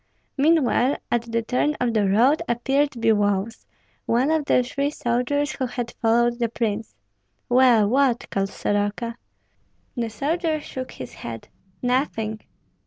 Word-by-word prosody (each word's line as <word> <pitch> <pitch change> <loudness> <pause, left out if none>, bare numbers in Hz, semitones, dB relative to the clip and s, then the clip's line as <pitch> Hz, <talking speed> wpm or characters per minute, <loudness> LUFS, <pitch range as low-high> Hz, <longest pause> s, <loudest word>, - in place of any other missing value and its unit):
Meanwhile 285 -3 +3
at 235 -1 -1
the 230 0 0
turn 255 +6 0
of 245 -2 0
the 205 -3 +2
road 245 +10 +4
appeared 270 +5 +1
Biloüs, 215 -2 0 0.4
one 250 +6 +2
of 315 -2 +1
the 250 - +3
three 280 +3 -1
soldiers 285 +3 -1
who 260 - -3
had 240 -1 -4
followed 235 +1 +2
the 235 -1 0
prince. 220 - -3 0.5
"Well, 245 -4 +5
what?" 255 +1 +2
called 195 0 0
Soroka. 205 +4 -2 0.8
The 235 -3 -2
soldier 310 - -1
shook 260 -3 -7
his 130 - -9
head. 115 -1 -8 0.3
"Nothing!" 235 -4 -1
240 Hz, 135 wpm, -23 LUFS, 225-275 Hz, 0.8 s, Well